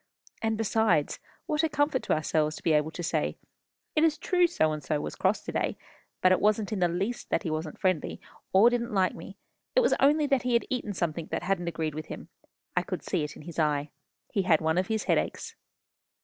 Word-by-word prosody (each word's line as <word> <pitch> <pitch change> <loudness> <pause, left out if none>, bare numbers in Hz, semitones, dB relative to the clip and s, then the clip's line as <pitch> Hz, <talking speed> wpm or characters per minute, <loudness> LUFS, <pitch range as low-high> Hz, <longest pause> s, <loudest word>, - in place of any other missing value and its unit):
And, 220 -1 0
besides, 215 -8 +1 0.3
what 305 -3 +1
a 320 - +1
comfort 290 -2 +1
to - - 0
ourselves 155 0 +1
to - - -11
be 165 - +3
able 150 +1 +2
to 175 +2 -6
say, - - -1 0.6
'It 305 - +4
is 315 -2 +3
true 360 -1 +3
So 155 - +1
and 155 -1 -4
so 150 +2 0
was - - -5
cross - - +1
to - - -5
day. - - -1 0.5
But 185 - +6
it 185 - +3
wasn't 210 0 +2
in 205 - -2
the 175 - +4
least 195 +8 -3
that - - 0
he 165 - -2
wasn't 155 0 -4
friendly, 185 -5 0 0.3
or 210 +6 +6
didn't 235 -3 -1
like 185 -2 +3
me; 195 - -10 0.4
it - - +6
was 485 - +3
only 295 +2 +4
that 275 -3 +2
he 250 -1 -1
had 235 - +3
eaten 220 -6 -2
something 170 -1 -2
that - - -3
hadn't 180 -2 -1
agreed 160 -2 -2
with 155 +1 -6
him. - - -8 0.5
I - - +3
could - - -5
see 180 -5 -1
it 150 - -5
in - - -11
his 170 +1 -7
eye. 150 -1 +1 0.4
He 205 - +1
had 175 -4 +4
one 160 +2 +1
of 185 - -1
his 220 -1 -1
headaches. - - -1
185 Hz, 230 wpm, -28 LUFS, 160-235 Hz, 0.6 s, But